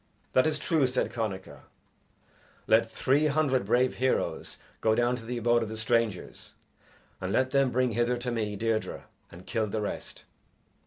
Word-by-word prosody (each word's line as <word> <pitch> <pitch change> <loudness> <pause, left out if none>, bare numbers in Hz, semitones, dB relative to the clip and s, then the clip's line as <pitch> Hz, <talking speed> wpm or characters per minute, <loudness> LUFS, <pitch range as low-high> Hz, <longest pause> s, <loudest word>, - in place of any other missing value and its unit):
"That 130 +4 +4
is 155 -1 0
true," 150 -2 +2
said 125 - -1
Connachar; 100 -5 -4 1.1
"let - - +4
three 145 +4 +2
hundred 140 -6 +1
brave 125 +3 +2
heroes 130 0 -1 0.2
go 110 -1 +2
down 120 +1 +2
to 115 - -10
the 120 +1 -3
abode 120 0 +3
of 110 - -3
the 110 - -6
strangers, 110 -3 -1 0.7
and 95 0 -2
let 130 +4 +1
them 135 -1 +3
bring 125 0 +1
hither 120 +2 +1
to 120 +1 -3
me 110 -3 -2
Deirdre, 110 +1 -2 0.3
and 90 +2 -12
kill 110 -2 -1
the 110 +2 -2
rest." 105 - -5
120 Hz, 165 wpm, -28 LUFS, 110-130 Hz, 1.1 s, That